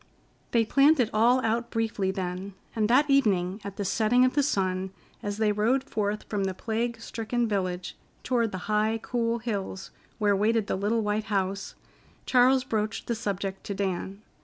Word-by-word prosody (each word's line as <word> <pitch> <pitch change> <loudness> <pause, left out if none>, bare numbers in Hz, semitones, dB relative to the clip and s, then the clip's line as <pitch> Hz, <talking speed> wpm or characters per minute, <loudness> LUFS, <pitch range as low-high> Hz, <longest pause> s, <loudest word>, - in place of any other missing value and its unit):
They 230 -1 +2
planned 280 +6 +4
it 235 -3 +2
all 240 +4 +4
out 230 +2 0
briefly 225 -4 -1
then, 190 +1 -4 0.2
and 215 -1 +1
that 275 +5 +5
evening, 205 -8 +2
at 200 -1 -7
the 200 - -2
setting 235 +6 +3
of 255 - +1
the 290 - +3
sun, 190 -8 0 0.3
as 205 0 -3
they 215 -1 +2
rode 230 +6 +1
forth 210 -5 -2
from 200 -2 -1
the 190 -1 -2
plague 230 +3 -2
stricken 230 +1 -2
village 185 -4 -2 0.3
toward 235 -4 +1
the 190 - -4
high, 215 +1 +1
cool 235 -1 0
hills 200 -5 -4 0.3
where 205 -2 +2
waited 220 +2 +2
the - - -1
little 210 +4 0
white 210 +1 -1
house, 195 -1 -2 0.5
Charles 255 +1 +4
broached 220 -3 -2
the 235 - -1
subject 195 -3 -3
to 200 - -4
Dan. 195 +1 -3
215 Hz, 175 wpm, -27 LUFS, 195-235 Hz, 0.5 s, that